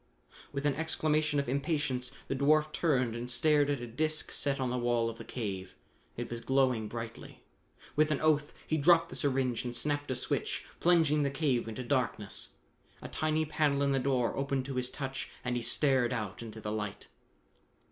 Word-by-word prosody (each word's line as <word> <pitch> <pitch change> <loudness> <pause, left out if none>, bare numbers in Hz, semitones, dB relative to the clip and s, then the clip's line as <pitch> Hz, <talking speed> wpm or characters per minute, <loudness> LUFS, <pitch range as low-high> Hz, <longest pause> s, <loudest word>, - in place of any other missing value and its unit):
With 140 0 -3
an 145 - +3
exclamation 155 -1 +1
of 140 - -2
impatience 140 -2 0 0.2
the 135 - -1
dwarf 150 +3 +3
turned 130 -8 +1
and 120 +1 -4
stared 145 +2 +3
at 140 -3 0
a - - -4
disc 155 +7 0
set 140 -1 -1
on 130 -2 0
the 125 - -1
wall 120 -1 +1
of 115 - -13
the - - -6
cave. 95 -6 -5 0.4
It 120 0 -4
was 120 - -3
glowing 130 -5 +2
brightly. 115 0 -7 0.5
With 155 0 +4
an 150 - +1
oath 150 -2 +2
he 155 - 0
dropped 165 +2 +5
the - - -7
syringe 130 -4 0
and 120 -1 -4
snapped 145 +2 -1
a 130 - 0
switch, 125 - -1
plunging 160 -4 +4
the 140 - +2
cave 135 -4 0
into 115 +3 -5
darkness. 120 -6 -1 0.5
A - - -6
tiny 155 0 0
panel 145 -2 +1
in 140 - +2
the 135 - +2
door 130 -3 +1
opened 135 -1 -1
to 135 - -4
his 125 -1 -1
touch 135 -1 -5 0.2
and 125 0 0
he 120 - -1
stared 130 0 +2
out 110 -3 -4
into 110 -1 -8
the 105 -1 -4
light. 105 -2 -4
135 Hz, 190 wpm, -31 LUFS, 120-150 Hz, 0.5 s, dropped